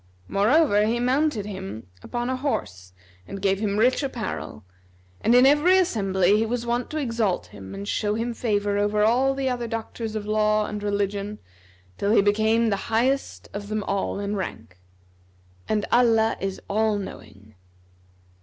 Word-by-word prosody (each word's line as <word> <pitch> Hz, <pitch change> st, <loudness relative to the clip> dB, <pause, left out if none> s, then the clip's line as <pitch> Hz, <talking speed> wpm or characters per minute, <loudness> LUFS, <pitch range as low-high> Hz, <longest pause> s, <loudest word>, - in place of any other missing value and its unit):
Moreover 210 Hz, +1 st, +3 dB
he 235 Hz, +2 st, 0 dB
mounted 255 Hz, -3 st, +1 dB
him 190 Hz, -, -7 dB, 0.2 s
upon 240 Hz, 0 st, -4 dB
a 260 Hz, -, 0 dB
horse 95 Hz, -, -3 dB, 0.4 s
and 195 Hz, -, -6 dB
gave 195 Hz, 0 st, +1 dB
him 205 Hz, -1 st, -1 dB
rich 250 Hz, +6 st, +3 dB
apparel; 235 Hz, -, -5 dB, 0.6 s
and 235 Hz, -, +4 dB
in 250 Hz, +1 st, +7 dB
every 295 Hz, +7 st, +5 dB
assembly 195 Hz, -, +2 dB
he 220 Hz, -, +1 dB
was 240 Hz, +1 st, -2 dB
wont 240 Hz, +1 st, -1 dB
to 310 Hz, -, -4 dB
exalt 230 Hz, -9 st, -1 dB
him 95 Hz, -2 st, -9 dB
and 200 Hz, +1 st, -6 dB
show 210 Hz, 0 st, 0 dB
him 235 Hz, +2 st, -2 dB
favour 205 Hz, -3 st, 0 dB
over 210 Hz, +1 st, +1 dB
all 255 Hz, +5 st, +3 dB
the 270 Hz, -1 st, -1 dB
other 245 Hz, -2 st, -2 dB
doctors 225 Hz, 0 st, -5 dB
of 210 Hz, -1 st, -3 dB
law 215 Hz, 0 st, +2 dB
and 210 Hz, 0 st, -5 dB
religion 205 Hz, 0 st, -2 dB, 0.6 s
till 200 Hz, -, 0 dB
he 230 Hz, -, +6 dB
became 220 Hz, +2 st, +2 dB
the 200 Hz, -, -3 dB
highest 255 Hz, +5 st, 0 dB
of 205 Hz, 0 st, -6 dB
them 215 Hz, 0 st, -2 dB
all 195 Hz, 0 st, -2 dB
in 205 Hz, +1 st, -2 dB
rank. 110 Hz, -, -6 dB, 0.9 s
And 215 Hz, -1 st, +1 dB
Allah 225 Hz, -2 st, +4 dB
is 195 Hz, 0 st, -3 dB
All 215 Hz, +1 st, +1 dB
knowing. 105 Hz, -, -10 dB
215 Hz, 165 wpm, -24 LUFS, 200-240 Hz, 0.9 s, in